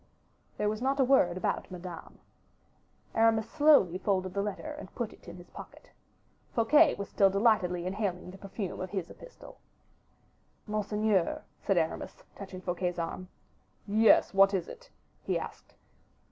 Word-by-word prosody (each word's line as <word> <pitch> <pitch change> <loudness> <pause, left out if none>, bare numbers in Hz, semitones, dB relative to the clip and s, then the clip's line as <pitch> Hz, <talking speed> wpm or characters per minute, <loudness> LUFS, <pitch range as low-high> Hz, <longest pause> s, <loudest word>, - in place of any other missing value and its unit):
There 210 - 0
was 215 +2 -2
not 270 +2 0
a - - +6
word 245 -10 +3
about - - -2
Madame. 180 -2 -9 1.0
Aramis 225 0 +3
slowly 275 - +4
folded 185 -2 -1
the 200 - 0
letter 210 +9 -4
and - - -11
put 235 -3 -3
it - - -20
in 170 +1 -9
his 175 - -15
pocket. - - -12 0.6
Fouquet 290 +7 +5
was 200 - -5
still 195 -1 +3
delightedly 195 -4 +2
inhaling 185 -2 -3
the 195 - -13
perfume 195 -1 -6
of 185 0 -4
his 190 -4 -4
epistle. - - -14 1.1
"Monseigneur," 210 -3 0 0.2
said 195 - 0
Aramis, 160 -1 -2
touching 190 -2 -9
Fouquet's 180 0 -2
arm. 175 +2 -4 0.6
"Yes, 215 +1 +4
what 195 +1 +5
is 175 -3 -2
it?" - - -12 0.3
he - - -1
asked. - - -9
195 Hz, 145 wpm, -30 LUFS, 180-220 Hz, 1.1 s, a